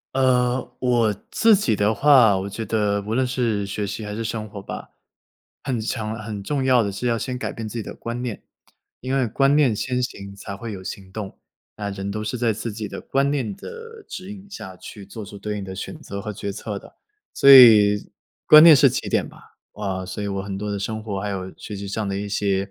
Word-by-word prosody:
呃， 125 -1 +1
我 120 -4 +2 0.2
自 225 -3 +5
己 115 - +1
的 105 +2 +2
话， 125 -5 +5
我 95 +1 -4
觉 110 +2 -5
得 100 -1 0
无 105 +2 -4
论 130 +2 +1
是 115 -6 -1
学 100 +1 -3
习 105 +2 -5
还 105 0 -5
是 115 - -3
生 110 -1 -4
活 100 -1 -8
吧， - - -8 0.7
很 125 -5 -2
强、 110 -1 -3
很 110 -2 -6
重 135 +7 -2
要 130 -2 +4
的 100 - -1
是 100 +5 -5
要 115 -1 +2
先 125 +2 -4
改 - - -4
变 110 -1 -6
自 105 - -8
己 110 - -3
的 - - -7
观 120 +1 -5
念， 120 -4 -5 0.6
因 130 +1 -3
为 130 -3 +2
观 135 +5 +2
念 130 -7 +3
先 125 +4 -1
行 100 -5 -5
才 100 0 -8
会 115 +2 -7
有 95 -2 -7
行 95 0 -8
动。 100 -2 -7 0.4
那 105 -1 -4
人 100 0 -5
都 110 +1 -4
是 115 +3 -3
在 115 -2 +1
自 110 +2 -5
己 105 0 -5
的 - - -7
观 140 +1 +1
念 130 -8 -1
的 460 -2 -10
指 185 +2 -7
引 200 -1 -11
下 95 - -9
去 100 -2 -10
做 105 +2 -8
出 100 0 -10
对 105 +1 -4
应 100 - -5
的 95 - -7
选 95 - -7
择 100 0 -7
和 105 - -5
决 100 0 -5
策 105 0 -5
的。 - - -17 0.4
所 140 - +6
以， 105 -6 +8 0.4
观 155 0 +10
念 165 -2 +10
是 140 -1 +6
起 - - -3
点 - - +1
吧。 - - -17 0.2
啊， 95 -3 -4
所 105 +3 -5
以 - - -2
我 100 0 -2
很 95 0 -5
多 105 0 -4
的 100 - -3
生 110 +2 -4
活 100 -3 -3
还 105 - -3
有 95 -2 -4
学 105 - -7
习 100 0 -6
上 105 0 -2
的 95 - -2
一 100 0 -4
些， 100 -1 0
110 Hz, 255 characters per minute, -23 LUFS, 100-125 Hz, 0.7 s, 观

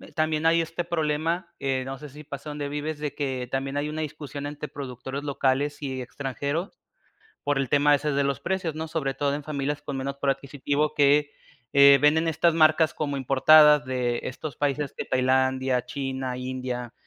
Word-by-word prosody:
también 155 0 0
hay 165 +1 +4
este 165 +1 -3
problema, 165 +1 -1
em, 130 -1 -1
no 135 +1 -5
sé 150 +2 -10
si 150 +3 -12
pasa 140 0 -8
dónde 145 -1 -4
vives, 150 +1 -4
de 150 -1 -3
que 130 -3 -3
también 135 +1 -2
hay 145 +1 -1
una 155 +1 -4
discusión 145 -2 -6
entre 150 +1 -5
productores 135 0 -6
locales 140 +1 0
y 130 -2 -4
extranjeros, 140 - -4 0.6
por 145 -1 +1
el 135 -1 0
tema 145 0 +4
ese 150 +1 -1
de 140 0 +2
los 140 -3 -1
precios, 185 -4 -2
¿no?, 160 +1 -4
sobre 155 -4 -2
todo 140 0 -1
en 150 - -6
familias 145 0 -3
con 140 -2 -5
menos 135 +1 -3
poder 140 -1 +1
adquisitivo 145 +2 -2
que, 145 0 +3 0.4
eh, 140 0 +8
venden 160 +3 +4
estas 165 +1 +2
marcas 155 0 +4
como 145 -2 -2
importadas 150 +2 +6
de 125 -2 -1
estos 135 +1 -6
países 145 -1 -1
que - - -4
Tailandia, 130 0 +1
China, 130 -1 -4
India, 125 -2 -4
145 Hz, 185 wpm, -26 LUFS, 135-150 Hz, 0.6 s, eh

